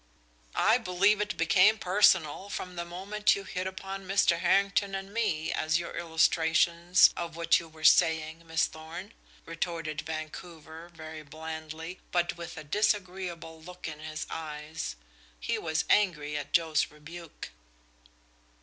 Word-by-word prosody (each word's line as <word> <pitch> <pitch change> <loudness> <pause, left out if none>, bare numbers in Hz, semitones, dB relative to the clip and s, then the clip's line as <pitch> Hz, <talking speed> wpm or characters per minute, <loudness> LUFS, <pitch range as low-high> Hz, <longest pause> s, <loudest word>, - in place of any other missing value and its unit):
"I 225 +3 +4
believe 200 +1 +2
it 210 0 -3
became 185 +6 +5
personal 185 -2 +3
from 180 -2 -5
the 170 0 -4
moment 200 +4 +1
you 200 - -6
hit 185 -1 -4
upon 195 0 -6
Mr. 190 -3 +3
Harrington 195 +2 +2
and 195 +1 -6
me 175 -9 0
as 160 +1 +1
illustrations 170 +1 +3
of 170 -1 -5
what 170 0 +3
you 170 - -10
were 155 0 -15
saying, 160 0 +4
Miss 160 0 +2
Thorn," 165 +7 -9 0.3
retorted 165 -2 -3
Vancouver, 160 +1 -8
very 160 -1 -9
blandly, 160 +3 -7
but 175 -1 +1
with 170 0 -8
a - - -6
disagreeable 180 -2 -2
look 180 +2 -9
in 150 -1 -7
his 155 0 -5
eyes. 155 0 -5 0.4
He - - -2
was 160 -1 -1
angry 150 -8 +2
at 145 - -4
Joe's 160 -2 +2
rebuke. 155 - -10
170 Hz, 135 wpm, -29 LUFS, 160-185 Hz, 0.4 s, became